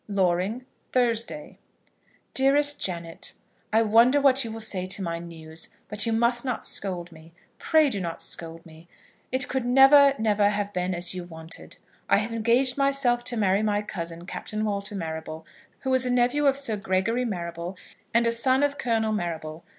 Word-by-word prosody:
Loring, 195 +4 0 0.3
Thursday. 240 +3 -1 0.7
DEAREST 285 +2 +3
JANET, 170 -2 -2 0.4
I 220 +1 +4
wonder 230 +6 +5
what 275 -1 +4
you 230 - -6
will 225 - -7
say 190 -4 -1
to 195 +1 -1
my 170 -1 -3
news? 160 -1 -5 0.2
But 210 +2 0
you - - +1
must 235 +2 +2
not 255 -3 -3
scold 180 -3 -2
me. 160 0 -16 0.3
Pray 315 -2 +3
do 205 -8 -2
not 170 -2 -5
scold 165 0 -3
me. 160 +1 -16 0.4
It 260 0 +1
could 265 -1 -2
never, 270 +3 +6
never 210 -2 +2
have 205 0 -3
been 180 0 -1
as 175 +1 +2
you 180 -1 -5
wanted. 160 -1 -9 0.3
I - - +5
have 220 +3 -2
engaged 240 +4 +2
myself 275 -3 +2
to 245 -1 -2
marry 200 -1 +2
my 210 -1 0
cousin, 170 -4 -6
Captain 215 +3 -5
Walter 205 0 -3
Marrable, 160 -2 -6 0.4
who 265 - -1
is 260 -1 +4
a 250 - -1
nephew 250 +4 +2
of 275 0 +3
Sir 235 -7 +1
Gregory 200 +5 0
Marrable, 175 -4 -5 0.3
and 235 +1 +2
a 230 - +2
son 260 +4 +2
of 285 0 0
Colonel 225 -3 0
Marrable. 165 -4 -4
215 Hz, 175 wpm, -25 LUFS, 175-250 Hz, 0.7 s, never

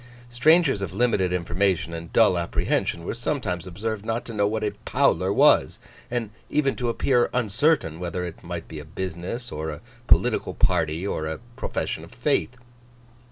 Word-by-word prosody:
Strangers 145 - +4
of 95 -3 -4
limited 100 -6 +2
information 85 -1 0
and 85 0 -7
dull 110 -5 +5
apprehension 85 0 -1
were - - -2
sometimes 110 - -2
observed 105 +3 -4
not 115 +2 -2
to 115 - -7
know 105 -1 +2
what 110 +1 -2
a 105 - 0
Powler 125 -9 +2
was, - - +4 0.3
and 120 -3 -2 0.2
even 140 -3 +1
to 125 -2 -1
appear 120 +1 +2
uncertain 115 - +1
whether 90 0 -3
it 85 - -8
might 85 -1 -6
be 80 - -7
a - - -8
business, 90 - -5
or 80 +1 -4
a 75 - -7 0.3
political 120 -2 +3
party, 80 +3 +1
or 80 -5 -2
a 80 - -3 0.2
profession - - -3
of - - -13
faith. 125 - 0
100 Hz, 165 wpm, -25 LUFS, 85-120 Hz, 0.3 s, dull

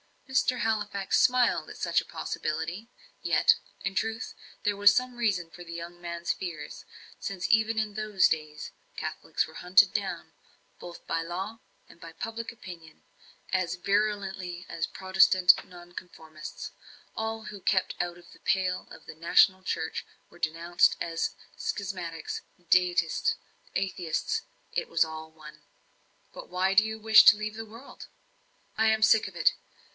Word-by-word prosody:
Mr. 260 -1 +1
Halifax 210 -3 +1
smiled 250 -1 +3
at - - -9
such - - +2
a - - -6
possibility. 160 +7 -4 0.3
Yet, - - +4 0.3
in 195 -1 -2
truth, 225 +2 -2 0.3
there 205 -1 +1
was 205 0 +7
some 250 0 0
reason 190 -8 0
for 175 +3 -10
the 170 - -8
young 170 +1 -7
man's 170 0 -3
fears; 170 -5 -6 0.3
since, 195 -3 -3
even 220 0 +3
in 215 -1 0
those 215 -2 +2
days, 155 -1 -3 0.3
Catholics - - -2
were - - -14
hunted 180 +2 +5
down - - -3 0.5
both 175 -1 -10
by 165 - -1
law 190 +7 -5 0.3
and - - -17
by 165 -1 -10
public 225 +4 -5
opinion, 175 -8 -12 0.5
as 185 -2 0
virulently 190 -2 -1
as 160 - -2
Protestant 185 -1 +5
nonconformists. 175 -3 -10 0.4
All 220 0 -3
who 205 -1 -8
kept 185 0 +1
out 175 0 -2
of 175 - -17
the - - -17
pale 185 -1 0
of - - -13
the - - -9
national 180 +3 +4
church - - -3 0.2
were - - -18
denounced 170 +2 +2
as 165 -1 -2 0.2
schismatics, 180 -5 -4 0.3
deists, 180 - +3 0.4
atheists 180 -4 -1 0.3
it - - -2
was 165 0 +3
all 160 0 -7
one. 155 -1 -14 0.7
"But - - -9
why 185 +2 +1
do 210 +2 +6
you 220 0 -4
wish 220 0 +8
to 210 - +9
leave 215 0 -4
the 225 0 -6
world?" 230 +5 -12 0.7
"I 220 0 +3
am 220 0 +3
sick 220 -1 +5
of 190 - -11
it. 170 - +4
185 Hz, 150 wpm, -28 LUFS, 170-215 Hz, 0.7 s, to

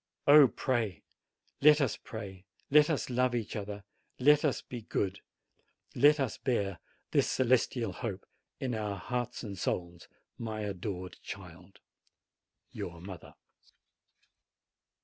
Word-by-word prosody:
Oh, 145 -1 +9
pray! 115 -8 -1 0.6
let 150 +1 +7
us 140 -5 +1
pray, 100 -4 -9 0.2
let 150 +1 +6
us 145 -4 -1
love 125 0 +2
each 115 -3 -3
other, 105 -1 -5 0.3
let 150 +3 +5
us 145 -4 +1
be 120 -2 -7
good, 100 -2 -2 0.7
let 150 +1 +5
us 130 -5 -1
bear 100 - -1 0.3
this - - +3
celestial 125 -1 +1
hope 100 -6 -5 0.3
in 130 -2 -2
our 105 -2 -2
hearts 125 +3 -3
and 100 -4 -6
souls, 85 -1 -3 0.3
my 110 -2 -4
adored 95 -2 -5
child! - - -10 0.9
YOUR 85 -1 -6
MOTHER. 90 0 -10
115 Hz, 120 wpm, -31 LUFS, 100-130 Hz, 0.9 s, Oh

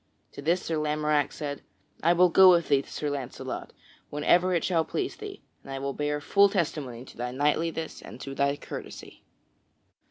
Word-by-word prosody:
To - - -9
this 170 +5 +1
Sir 165 - -1
Lamorack 150 -1 +1
said: 145 -2 -5 0.4
"I 170 +2 +4
will 180 +1 +5
go 190 +2 +8
with 170 -2 +4
thee 140 -1 +4
to - - -16
Sir 150 -1 -2
Launcelot 135 -4 -5 0.4
whenever 175 +5 +3
it 175 -2 +1
shall 170 -3 +2
please - - -3
thee; - - -9 0.2
and 135 - -10
I 135 - -3
will 140 0 -3
bear 150 +1 -1
full 200 +7 +4
testimony 145 - -2
to - - -15
thy 120 +1 -3
knightliness 155 +4 -1
and - - -11
to 135 - -6
thy 140 +1 +1
courtesy." - - -9
150 Hz, 185 wpm, -27 LUFS, 140-170 Hz, 0.4 s, go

